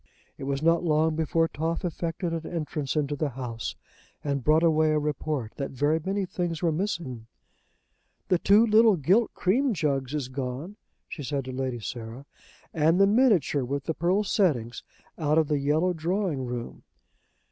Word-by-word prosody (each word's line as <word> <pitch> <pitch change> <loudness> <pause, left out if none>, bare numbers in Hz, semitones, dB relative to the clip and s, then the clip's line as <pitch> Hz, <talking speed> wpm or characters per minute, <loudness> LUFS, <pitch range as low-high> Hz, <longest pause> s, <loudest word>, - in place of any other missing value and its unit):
It - - -7
was 140 +1 -2
not 165 +1 +3
long 160 -1 +2
before 165 +1 +1
Toff 165 +3 -3
effected 170 0 -3
an 165 -1 -4
entrance 155 -4 -3
into 145 -1 0
the 150 0 -1
house, 120 -3 -5 0.5
and 140 -3 -2
brought 155 +4 +4
away 155 -1 +4
a - - +2
report 150 -5 -2
that 140 - -3
very 145 +4 +1
many 195 +2 -1
things 175 -2 -3
were 170 - +3
missing. 155 - -3 1.0
"The 180 - +2
two 205 +5 +5
little 220 -1 +5
gilt 185 - +2
cream 240 +6 +1
jugs 140 -4 -1
is 140 -4 -2
gone," 130 +8 -5 0.3
she - - -7
said 140 -1 -3
to 130 - -5
Lady 130 -2 -3
Sarah, 115 +4 -7 0.5
"and 160 +2 +3
the 195 - +7
minitshur 200 - +3
with 140 +2 -3
the 160 - -2
pearl 180 +6 +1
settings 130 - 0 0.4
out 155 -1 +2
of 160 -2 +3
the 150 -2 +1
yellow 155 +6 +1
drawing 170 -4 -1
room!" 120 -1 -6
155 Hz, 170 wpm, -27 LUFS, 135-175 Hz, 1.0 s, the